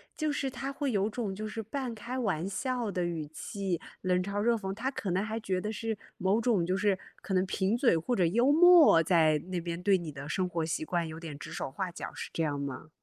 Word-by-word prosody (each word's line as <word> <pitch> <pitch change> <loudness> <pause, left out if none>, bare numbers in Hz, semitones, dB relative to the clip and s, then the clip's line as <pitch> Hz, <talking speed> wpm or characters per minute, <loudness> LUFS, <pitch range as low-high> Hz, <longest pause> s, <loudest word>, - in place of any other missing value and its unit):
就 310 -1 0
是 275 -2 -1
他 270 +2 -4
会 280 -1 -2
有 205 0 +1
种 210 -4 -3
就 215 +2 -4
是 225 +1 -4
半 245 +2 -4
开 240 +4 -5
玩 190 -8 0
笑 240 +1 -2
的 180 -2 -1
语 160 -3 -3
气， 185 +2 -3 0.2
冷 180 -1 +2
嘲 200 +1 -2
热 235 +1 +3
讽。 195 -3 -3
他 245 +6 -2
可 205 -9 -3
能 190 +3 +1
还 220 +1 -3
觉 190 -4 -1
得 215 - -3
是 225 0 -3 0.2
某 195 +5 +2
种 215 -8 +2
就 185 - 0
是 195 0 +2 0.2
可 195 - -4
能 185 +1 +3
贫 190 +4 0
嘴 240 -9 +4
或 240 +10 -1
者 180 - +3
幽 235 +11 +3
默， 330 - +8
在 160 -3 +4
那 180 - 0
边 170 0 -4
对 195 0 +4
你 170 -4 -6
的 140 +1 -8
生 185 +4 0
活 165 -2 -1
习 160 - -2
惯 170 0 -1
有 160 +1 -7
点 155 -4 -7
指 - - -9
手 - - -3
画 185 +5 -3
脚， - - -7
是 - - -6
这 165 - -1
样 145 -2 -1
吗？ 140 +2 -5
195 Hz, 265 characters per minute, -30 LUFS, 170-230 Hz, 0.2 s, 默